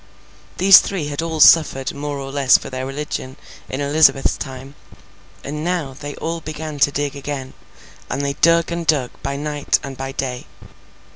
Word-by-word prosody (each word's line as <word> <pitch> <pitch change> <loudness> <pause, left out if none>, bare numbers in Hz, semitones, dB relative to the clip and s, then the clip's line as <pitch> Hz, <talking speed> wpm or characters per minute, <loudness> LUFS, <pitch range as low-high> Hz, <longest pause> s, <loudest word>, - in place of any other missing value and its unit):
These 195 +1 +9
three 170 -7 -4
had 145 +1 -3
all 165 -1 -4
suffered 145 -4 +5
more 145 0 -5
or 135 0 -6
less 135 -2 +4
for - - -10
their 130 0 -4
religion 135 -2 -5 0.3
in 130 - -4
Elizabeth's 140 -1 +3
time. 135 0 -8 0.7
And 150 +2 -5
now, 170 -6 -2
they 145 +2 -8
all 165 0 -4
began 155 -1 -6
to 145 - +4
dig 145 0 -3
again, 140 -2 -6 0.6
and 140 - -2
they 140 - -1
dug 170 +3 +3
and 170 -1 -4
dug 135 -6 +1
by 140 0 -3
night 145 0 0
and 135 -1 -7
by 135 +1 -5
day. 130 -3 -4
145 Hz, 170 wpm, -20 LUFS, 135-155 Hz, 0.7 s, These